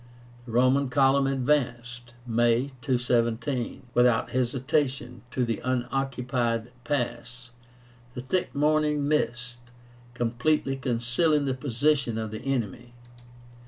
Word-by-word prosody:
The - - -7
Roman 130 +3 +3
column 135 +1 +3
advanced 120 -3 -1
(May, 120 +3 +2
217), 120 -1 0
without 120 -2 +3
hesitation, 130 -1 -1
to 125 0 -1
the 115 -3 -2
unoccupied 125 -2 -1
pass, 120 -3 -3 0.6
the 125 - -4
thick 175 +8 -2
morning 150 0 +2
mist 120 -5 -1 0.6
completely 125 +4 0
concealing 130 +5 +1
the 135 - 0
position 130 -1 0
of 110 -1 -3
the 110 - -6
enemy. 120 -3 -3
125 Hz, 100 wpm, -27 LUFS, 120-135 Hz, 0.6 s, Roman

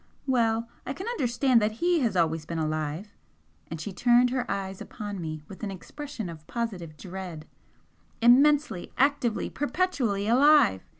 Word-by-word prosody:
"Well, 230 -3 +1 0.2
I 265 - -4
can 375 - -7
understand 255 - +2
that 210 +1 +1
HE 345 +8 +1
has 235 -8 0
always 165 -2 +1
been 170 - -4
alive!" 155 +5 -3 0.6
and 165 - -5
she 190 +5 -5
turned 245 +3 +4
her 250 -2 -2
eyes 195 -1 -3
upon 205 -4 -6
me 155 -2 -5
with 195 - -11
an 210 - -3
expression 230 - -7
of 160 -2 -10
positive 190 -10 -4
dread 180 -4 -7 0.7
"Immensely, 270 -3 +4
actively, 270 -4 +1
perpetually 270 - -1
alive! 260 - +5
220 Hz, 145 wpm, -27 LUFS, 175-260 Hz, 0.7 s, alive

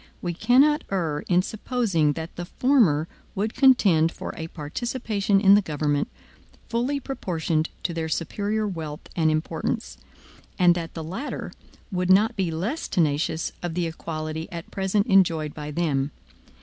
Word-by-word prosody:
We 175 -1 -3
cannot 275 - +4
err 165 -6 0
in 180 0 +3
supposing 200 - 0
that 160 +2 -7
the 175 - -5
former 195 - +3 0.3
would 215 +3 -1
contend 195 - +5
for - - -6
a 160 - -5
participation 200 - -1
in 195 -1 +7
the 205 - +6
government, 150 -4 -1 0.6
fully 250 +5 0
proportioned 165 - -2
to 170 - -1
their 165 -1 -3
superior 205 +7 -1
wealth 160 -6 -6
and 160 -2 +3
importance; 155 - -2 0.6
and 180 -1 +6
that 170 -1 -5
the 165 - -4
latter 190 - -5 0.4
would 180 -1 -1
not 215 +5 +5
be 190 -4 0
less 195 - -3
tenacious 160 0 0
of 175 -2 -4
the 175 -1 0
equality 160 -1 -5
at 170 -1 -7
present 195 +1 +1
enjoyed 170 - +3
by 150 -1 -6
them. 145 -3 0
175 Hz, 150 wpm, -25 LUFS, 160-205 Hz, 0.6 s, in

